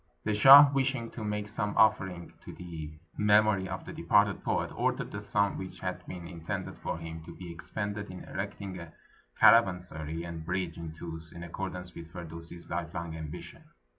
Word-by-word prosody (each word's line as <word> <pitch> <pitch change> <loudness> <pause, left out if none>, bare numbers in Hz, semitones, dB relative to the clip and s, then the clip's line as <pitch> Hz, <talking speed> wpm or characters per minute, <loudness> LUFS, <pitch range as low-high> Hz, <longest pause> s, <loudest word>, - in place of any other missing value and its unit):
The - - 0
shah, 140 +6 +10
wishing 135 -3 0
to 115 - -7
make 105 0 -2
some 105 -1 -2
offering 95 -5 +2
to - - -9
the 80 -4 -7 0.3
mem 105 0 +5
ory 95 -3 0
of - - -5
the - - -7
departed - - +2
poet, - - 0
ordered - - -1
the 100 - -5
simi 105 -1 +1
which 95 -1 -7
had 90 0 -3
been 90 -2 -7
intended 85 -2 -5
for - - -3
him 80 -1 -7
to 85 - -10
be 90 -2 -8
expended 105 +4 -4
in 90 0 -8
erecting 95 -1 -5
a 85 -2 -10 0.5
caravansery 90 -7 +4
and 85 -2 -6
bridge 90 0 -2
in 80 -2 -6
Tus, 80 0 -8
in 85 - -8
accordance 90 +1 -5
with 85 -1 -9
Fir 85 0 -7
dusi's 85 +1 -8
Hfelong 85 -1 -4
ambition. 80 -1 -8
90 Hz, 180 wpm, -30 LUFS, 85-105 Hz, 0.5 s, shah